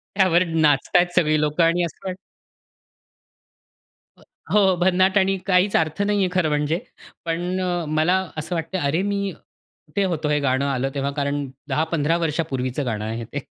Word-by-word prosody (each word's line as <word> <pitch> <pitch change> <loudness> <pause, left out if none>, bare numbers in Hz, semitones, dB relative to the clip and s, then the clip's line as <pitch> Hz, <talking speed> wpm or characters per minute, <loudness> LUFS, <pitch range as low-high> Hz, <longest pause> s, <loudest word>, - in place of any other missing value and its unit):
त्यावर 185 -3 +4
नाचत 155 -2 +1
आहेत 175 0 +2
सगळी 155 -3 +3
लोकं 150 +3 +1
आणि 170 +2 +3
असं 180 +4 -9
वाट 185 - -3 2.0
अ, - - -22 0.3
हो, 195 -3 +4
भन्नाट 185 +2 +3
आणि 195 0 +2
काहीच 185 +1 +3
अर्थ 160 +3 -1
नाही 205 0 +1
आहे 185 - +2
खरं 175 -4 +2
म्हणजे. 150 +3 0 0.5
पण 175 +3 -2
अ, 175 -2 -1
मला 155 +4 +2 0.2
असं 160 +3 -3
वाटतं 165 +3 -3
आहे 145 - 0
अरे, 160 +6 +1
मी 200 0 -1
कुठे 195 +6 -7
होतो 155 -1 -2
हे 150 0 +2
गाणं 140 0 +1
आलं 135 -1 -1
तेव्हा 140 0 -1
कारण 145 0 -2 0.2
10-15 160 +2 +1
वर्षांपूर्वीचं 145 -5 -2
गाणं 110 -3 -3
आहे 115 +1 -4
ते. 145 +5 -5
165 Hz, 170 wpm, -22 LUFS, 145-185 Hz, 2.0 s, त्यावर